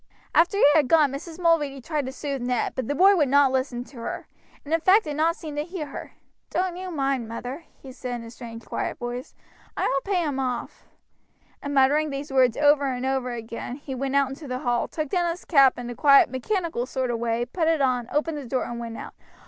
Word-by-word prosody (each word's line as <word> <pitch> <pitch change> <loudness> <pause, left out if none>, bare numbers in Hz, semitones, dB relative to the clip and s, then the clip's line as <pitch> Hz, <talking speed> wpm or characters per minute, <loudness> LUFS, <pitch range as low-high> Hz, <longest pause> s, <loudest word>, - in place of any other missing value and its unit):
After 350 +5 +4
he - - +5
had 300 -4 +4
gone 300 -2 +4
Mrs. 315 +4 -7
Mulready 310 -5 +2
tried 295 0 -3
to - - -4
soothe 275 -1 -4
Ned, 245 -1 -1
but 255 -3 -3
the 285 - -1
boy 390 +6 +6
would 295 -7 +2
not 280 -1 +5
listen 260 -2 -1
to 260 +1 -16
her, 230 - -5 0.4
and 300 - -3
in 330 - +4
fact 390 +5 +5
did 300 -2 -4
not 325 +2 +2
seem 310 -5 -8
to 295 - 0
hear 345 -1 -5
her. 280 - -9 0.4
"Don't 365 -1 -1
you 370 +1 -6
mind, 275 -7 -1
mother," 250 +7 -6
he 265 - -11
said 250 -1 -5
in 235 - -6
a 230 - -10
strange, 230 -1 -10
quiet - - -3
voice, 245 +2 -6 0.4
"I - - 0
will 275 +9 -1
pay 360 -3 +2
him 285 -4 -2
off;" 250 -2 -4 0.7
and 285 0 -4
muttering 290 +3 +4
these 275 0 -5
words 255 -3 +4
over 290 -1 +4
and 250 0 -3
over 265 -1 0
again 230 +1 -6
he 280 -1 -7
went 270 +1 -2
out 280 -1 +3
into 280 +2 -8
the 255 -1 -3
hall, 240 -1 +1
took 310 -3 -4
down 350 +1 +1
his 335 +2 -5
cap 275 -5 +5
in 245 -1 -6
a 245 - -4
quiet, 275 -2 +6
mechanical 320 - -2
sort 255 -2 -2
of 230 - -2
way, 235 0 0
put 320 +6 -1
it 325 -1 +3
on, 250 -3 +1
opened 300 +1 -1
the 270 - -8
door, 255 +1 0
and 235 0 -5
went 230 -1 -6
out. - - -8
275 Hz, 235 wpm, -25 LUFS, 250-310 Hz, 0.7 s, boy